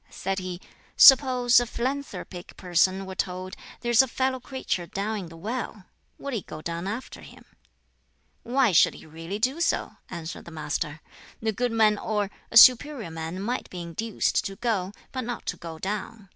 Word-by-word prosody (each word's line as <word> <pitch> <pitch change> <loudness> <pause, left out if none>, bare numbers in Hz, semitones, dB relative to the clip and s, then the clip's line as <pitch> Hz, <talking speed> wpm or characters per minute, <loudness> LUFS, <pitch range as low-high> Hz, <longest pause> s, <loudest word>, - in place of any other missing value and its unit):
Said 195 +1 -3
he, 185 -1 -5 0.4
"Suppose 255 -3 +7
a 245 - -2
philanthropic 250 -8 -5
person 185 +1 +1
were 190 - -7
told, 185 +1 -4 0.3
'There's 240 0 +5
a 265 - 0
fellow 260 +1 -1
creature 250 -9 -3
down 210 +4 -3
in 190 - -6
the 165 0 -12
well!' 215 0 -5 0.3
Would 280 -1 -6
he 225 - -1
go 155 - -9
down 170 +3 -4
after 225 +6 -6
him?" - - -14 1.0
"Why 250 -1 +2
should 175 - +5
he - - -13
really 165 +5 -6
do 260 +9 0
so?" - - 0
answered 165 -1 -7
the - - -9
Master. 150 -1 -4 0.4
"The 220 0 0
good 245 +3 -1
man 215 -2 +3
or, 210 -2 -1 0.2
a 230 - +3
superior 250 - +7
man 165 +2 -5
might 245 +4 -3
be 180 -1 -6
induced 205 +6 -1
to 195 -2 -4
go, 200 -4 -1 0.2
but 260 - -3
not 245 0 -5
to - - -2
go 165 -2 -8
down. 205 +2 -5
205 Hz, 175 wpm, -26 LUFS, 180-245 Hz, 1.0 s, Suppose